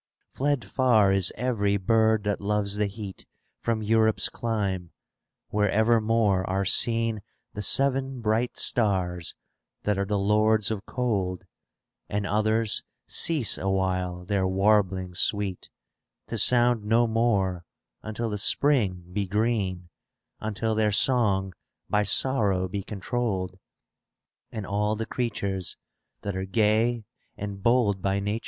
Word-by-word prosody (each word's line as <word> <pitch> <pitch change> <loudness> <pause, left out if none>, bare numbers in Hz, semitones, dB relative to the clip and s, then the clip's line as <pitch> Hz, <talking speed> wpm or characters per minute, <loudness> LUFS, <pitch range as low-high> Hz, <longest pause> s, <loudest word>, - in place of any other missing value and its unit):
Fled 140 -2 0
far 115 -7 +3
is 95 -2 +2
every 105 -4 0
bird 110 +2 +2
that 105 -2 -2
loves 100 0 -1
the 105 -1 +1
heat 100 -1 -8 0.3
From 115 -2 -1
Europe's 110 -2 +2
clime, 100 -6 -2 0.6
where 105 -1 +1
evermore 110 -3 +2
are 95 +1 0
• - - -3
seen 115 0 +2 0.3
The 105 - -5
seven 135 +2 +1
bright 115 +2 0
stars 90 -6 +1 0.5
that 105 -1 0
are 100 - 0
the 105 +1 -1
lords 105 +1 +2
of 105 -1 -5
cold; 100 -8 -2 0.6
And 100 0 -2
others 110 +1 +1 0.2
cease 155 -9 +1
awhile 95 -2 -1
their 95 -1 0
warblings 95 -2 +1
sweet, 100 -3 0 0.6
^ - - -51
To - - -3
sound 120 -2 +3
no 115 +3 +3
more 105 -6 0 0.4
until 110 +1 -4
the 105 - -3
Spring 105 -7 +2
be 100 -1 -1
green, 100 -4 -1 0.5
Unless 110 +1 -2
their 105 -1 +2
song 100 -5 +2 0.4
by 105 0 +2
sorrow 100 -6 +2
be 100 +2 -4
controlled: 100 -2 -3 0.9
And 110 -3 -5
all 105 +2 0
the 110 +1 -3
creatures 100 -7 -3 0.5
that 100 -2 -3
are 95 0 -3
gay 110 +3 +1 0.3
and 100 -1 -6
bold 105 -4 +2
winter. 100 +2 -1
105 Hz, 130 wpm, -26 LUFS, 95-115 Hz, 0.9 s, far